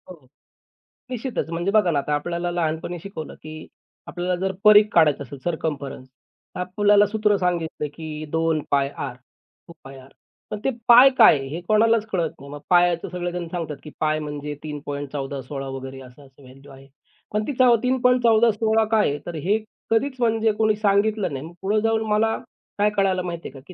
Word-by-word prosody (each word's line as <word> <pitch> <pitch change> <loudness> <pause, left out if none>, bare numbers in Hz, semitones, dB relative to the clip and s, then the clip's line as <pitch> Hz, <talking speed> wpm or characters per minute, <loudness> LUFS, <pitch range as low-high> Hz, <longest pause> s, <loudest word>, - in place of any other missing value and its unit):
हो. 150 -5 -25 0.9
निश्चितच 250 -7 -3
म्हणजे 170 +3 -1
बघा 210 -4 +3
ना 145 - +1
आता 150 +1 -2
आपल्याला 170 +4 -3
लहानपणी 170 0 -2
शिकवलं, 165 -3 -8
की 155 0 -10 0.4
आपल्याला 180 +1 -2
जर - - -1
परीघ 210 0 +8
काढायचं 150 -4 +4
असेल, 140 +1 -10
सर्कम्फरन्स. 145 -6 -4 0.5
आपल्याला 205 +3 +3
सूत्र 210 0 +1
सांगितलं 170 -4 -2
की 155 -1 -7
2πr 150 -5 -1 1.4
पण 210 - -4
ते - - +1 0.2
पाय 245 +3 +9
काय 220 -9 +7
हे 155 +5 -5
कोणालाच 220 0 +3
कळत 170 -4 0
नाही. 140 0 -11
मग 145 - -7
पायचं 175 -1 +3
सगळेजण 175 -1 -4
सांगतात, 165 -4 -5
की 155 - -9
पाय 155 0 +1
म्हणजे 150 -1 -5
3.14 145 -2 -5
16 135 +1 -6
वगैरे 135 0 -7
असं-असं 130 +2 -16
व्हॅल्यू 135 +2 -15
आहे. 135 0 -15 0.5
पण 210 0 0
ती 290 - -2
चव 250 -2 +6
3.14 250 -3 +3
16 220 +1 +1
काय 220 -2 +3
आहे, 145 +1 -3
तर 175 - -6
हे 185 +8 +1 0.3
कधीच 260 +4 +1
म्हणजे 225 -2 +2
कोणी 215 -1 +3
सांगितलं 205 -3 +1
नाही. 135 +2 -5
मग 165 - -11
पुढे 210 +3 +1
जाऊन 225 0 +1
मला 220 +1 +2 0.4
काय 205 +1 +4
कळायला 190 -2 +2
माहिती 170 -1 -5
आहे - - -11
का? 135 - -11
की 185 - -11
175 Hz, 165 wpm, -23 LUFS, 150-210 Hz, 1.4 s, पाय